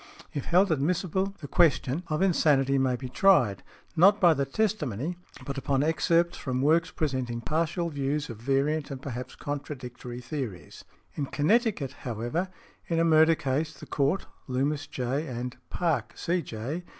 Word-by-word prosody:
If 140 - -3
held 185 +2 +4
admissible 180 +6 0
the 145 - -6
question 150 -1 +2
(of 155 +3 0
insanity) 140 -7 +3
may 130 -1 +2
be 130 +1 -6
tried, 125 - +4 0.3
not 195 +5 +6
by 175 -3 +6
the 140 -2 0
testimony, 160 - -1 0.3
but 140 -1 -3
upon 135 0 +1
excerpts 165 +2 +2
from 130 -1 -2
works 165 +4 +3
presenting 130 -8 -2
partial 165 - -1
views 145 +1 -1
of 115 - -7
variant 140 +5 0
and 135 -2 -5
perhaps 125 -2 -6
contradictory 125 -4 -6
theories. 125 - -6 0.3
In 140 - -3
Connecticut, 185 - +1
however, 120 - -2 0.4
in 165 - 0
a 165 - +3
murder 160 0 +6
case 155 +3 -2
the - - -9
Court 145 +7 0 0.2
(Loomis, 140 +3 -1
J., 135 +5 -2
and 125 -1 -4
Park, 160 -10 -1
C.J. 160 -3 -2
145 Hz, 150 wpm, -28 LUFS, 130-165 Hz, 0.4 s, not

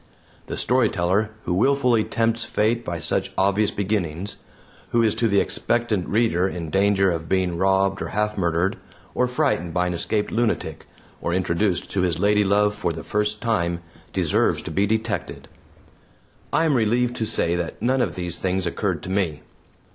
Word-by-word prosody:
The - - -4
storyteller 105 -4 +1
who 90 - -1
willfully 125 +2 +3
tempts 115 +1 0
Fate 115 +3 0
by 85 -5 -3
such 95 +3 -1
obvious 100 +2 +2
beginnings; 95 -2 -2 0.5
who 120 -1 +2
is 110 - +3
to 115 - +1
the 100 -2 +3
expectant 115 -6 0
reader 105 -4 +2
in 85 -4 -5
danger 95 -1 +3
of 80 -1 -4
being 95 -2 +1
robbed 95 +1 +2
or - - -2
half 105 +1 -1
murdered, 85 0 0 0.4
or 125 - +1
frightened 125 - 0
by 90 0 +2
an 90 - -1
escaped 105 +5 -1
lunatic, 120 0 -1 0.3
or 85 - -1
introduced 90 +1 0
to 95 - 0
his 90 -3 0
ladylove 105 +1 +3
for 105 -4 -2
the 80 0 -6
first 105 0 -1
time, 85 -7 0 0.3
deserves - - +1
to - - -6
be 100 +1 +1
detected. 110 +1 -2 1.0
I 165 - +2
am 155 - +3
relieved 120 +1 +1
to 110 - -1
say 85 -6 +3
that 85 -1 -4
none 130 +4 +1
of - - -1
these 90 -1 -2
things 95 0 -1
occurred 85 -1 -2
to 95 - -5
me. 90 -7 -1
100 Hz, 170 wpm, -23 LUFS, 90-110 Hz, 1.0 s, willfully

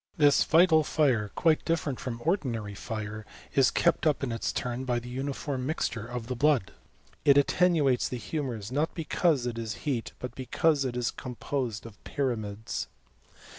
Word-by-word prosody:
This 145 -2 +5
vital 160 -1 +5
fire, 130 -10 +2
quite 160 -2 +3
difierent 160 -5 -1
from 120 -2 -5
ordinary 120 - -1
fire 110 +1 -5 0.3
is 135 -2 +5
kept 170 -1 +2
up 150 -2 +1
in 130 - -1
its 115 - -1
turn 125 +1 -3
by 125 -2 0
the 120 +1 -6
uniform 135 0 -3
mixture 115 -7 -2
of 120 -1 -5
the 125 +2 -3
blood. 140 -4 +2 0.5
It 140 -1 +6
attenuates 145 -3 +3
the 125 - -3
hnmours, 120 -6 -4
not 150 +5 0
because 160 -4 +1
it 120 -1 -3
is 115 -1 -4
heat 130 -6 -2
but 125 - -6
because 140 +3 +1
it 125 -1 -2
is 120 -1 0
com 125 -1 -7
posed 120 -2 -3
of 115 -3 -12
pyramids. 110 -6 -3
130 Hz, 170 wpm, -28 LUFS, 115-150 Hz, 0.5 s, It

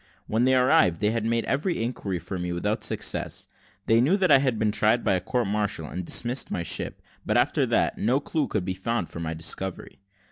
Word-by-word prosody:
When 115 +3 +1
they 130 0 +4
arrived, 125 -9 +4
they 105 0 +2
had 115 -1 -1
made 115 0 0
every 165 +6 -1
inquiry 110 -6 -3
for 90 +2 -6
me 90 0 -3
without 105 +5 -2
success: - - -1 0.4
they 115 +1 +4
knew 160 +11 +3
that 185 -3 +2
I 135 - +8
had 130 -4 0
been 110 -1 +1
tried 110 +3 +2
by 100 - +2
a 90 - 0
court 120 +5 -1
martial 100 -5 -2
and 90 +4 -5
dismissed 120 +8 +1
my 85 - -2
ship, - - -2 0.2
but - - 0
after - - +2
that, - - +1
no 125 +6 +2
clue 150 +1 -2
could 100 -4 -2
be 95 - -2
found 95 0 -2
for - - -8
my 80 -1 -3
discovery. 85 +3 -3
110 Hz, 220 wpm, -25 LUFS, 95-125 Hz, 0.4 s, I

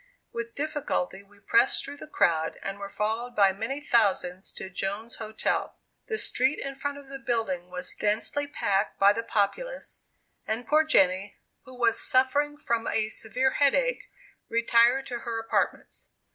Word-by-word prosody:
With 235 0 -5
difficulty 285 -10 -2
we 200 0 -22
pressed 405 - +3
through 285 +1 -8
the - - -10
crowd, 160 - +1
and 195 0 -4
were 200 0 -6
followed 225 +4 -2
by 195 -2 +5
many 225 +8 -3
thousands 195 -8 +1
to - - -7
Jones's 200 +5 -4
Hotel. 220 -1 -2 0.3
The 440 - -1
street 265 -7 +1
in 275 - -4
front 285 +1 -4
of 285 -1 -12
the 275 0 -8
building 225 -9 -2
was 180 0 -6
densely 220 +7 0
packed 205 -8 0
by 200 +1 +6
the 230 - -2
populace, 365 - -2 0.5
and 225 +3 -1
poor 305 +5 +4
Jenny, 195 -8 +2 0.3
who 255 -1 -12
was 235 -2 +3
suffering 285 +3 +2
from 235 -6 -1
a 215 -1 +1
severe 250 +5 0
headache, - - +2 0.4
retired 235 +3 +4
to 245 -3 -4
her 230 -1 -4
apartments. 225 - -2
230 Hz, 160 wpm, -27 LUFS, 200-275 Hz, 0.5 s, by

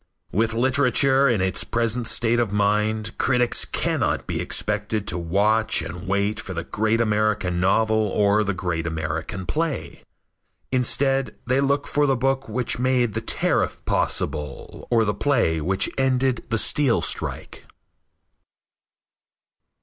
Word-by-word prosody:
With 115 +3 0
literature 130 +2 +3
in 115 -6 +1
its 95 0 -1
present 115 0 -1
state 115 0 +1
of 115 -4 0
mind 105 +2 0
critics 125 -2 +2
cannot - - -1
be - - -3
expected 105 0 -2
to - - -2
watch 105 +6 +1
and 90 +1 -7
wait 100 +2 0
for 95 -4 -7
the 85 - -3
great 110 +2 0
American 105 -5 0
novel 110 +3 +2
or 105 +1 +2
the 100 -2 -2
great 85 -3 -2
American 80 +3 -4
play. 155 - -3 0.7
Instead 135 +1 0
they 130 +2 +1
look 140 +1 +1
for 145 0 +1
the 135 -1 +2
book 135 0 -1
which 120 +1 0
made 125 -3 +1
the - - -2
tariff - - 0
possible, 75 -2 -2
or 115 -2 +3
the 105 - 0
play 100 - +1
which 95 +5 +1
ended 130 -1 +1
the 115 - 0
steel 135 +2 +2
strike. - - -3
110 Hz, 135 wpm, -23 LUFS, 100-125 Hz, 0.7 s, literature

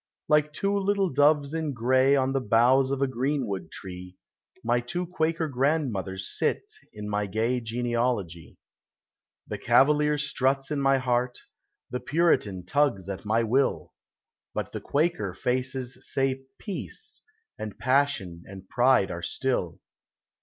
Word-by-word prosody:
Like 150 0 +3
two 195 +6 -1
little 200 -1 +1
doves 145 +1 +3
in 160 -3 -2
gray 130 +3 +3
On 135 -1 +1
the 135 - +1
boughs 125 +4 +4
of 140 0 0
a - - +2
greenwood 130 -6 -2
tree, 90 -1 -8 0.5
My 120 +1 +2
two 175 +10 -3
Quaker 165 -1 -1
grandmothers 125 - -1
sit - - 0 0.3
In 105 0 -7
my 105 0 -1
gay 115 +5 0
genealogy. 115 - -2 0.9
The - - -5
Cavalier 150 +1 +4
struts 135 -1 0
in 145 -2 0
my 135 0 +4
heart, 125 -1 0 0.5
The 125 - -2
Puritan 125 - +1
tugs 115 -6 +1
at 100 +2 -6
my 110 +2 +2
will, 130 +5 0 0.6
But - - -3
the - - -5
Quaker 140 - 0
faces 125 +2 -2
say 135 0 0
" 135 - -54
Peace," 200 -4 -6 0.4
And 105 -2 -6
passion 130 -10 +1
and 95 -1 -11
pride 125 -3 +3
are 85 - -5
still. 90 0 -1
130 Hz, 140 wpm, -27 LUFS, 110-145 Hz, 0.9 s, boughs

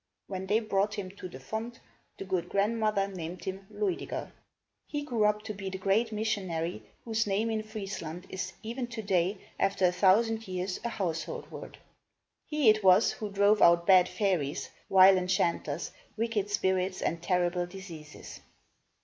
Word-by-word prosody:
When 190 -1 -5
they 210 +3 +3
brought 210 -1 0
him 190 -3 -5
to 185 - -7
the 130 - -10
font, 220 - -5 0.4
the 195 - -6
good 185 -2 -2
grandmother 210 -1 +1
named 180 -2 -7
him 190 0 -5
Luid 385 -4 -1
i - - -5
ger. - - -5 0.6
He 295 -1 -3
grew 235 -7 +1
up 210 0 +1
to 215 - -5
be 195 -1 -5
the 190 - -5
great 200 +4 +1
missionary, 185 - -2 0.2
whose 220 -2 0
name 210 +3 0
in 220 -1 0
Friesland 195 -5 -6
is, 190 - -4
even 240 +3 -4
today, 200 -5 0 0.2
after 195 -1 +2
a 180 - +4
thousand 220 +5 +3
years, 185 0 -3
a 235 - -1
household 170 -7 -3
word. - - -9 0.7
He 300 -4 +1
it 215 -1 +5
was 190 +3 +6
who 215 - -5
drove 200 +1 +3
out 170 0 +6
bad 185 -1 +6
fairies, 175 -8 -1 0.2
vile 190 0 +7
enchanters, 180 -2 -1 0.3
wicked 220 -3 -1
spirits 190 -2 0
and 165 0 -1
terrible 175 0 +1
diseases. 175 -5 -10
195 Hz, 165 wpm, -30 LUFS, 180-215 Hz, 0.7 s, vile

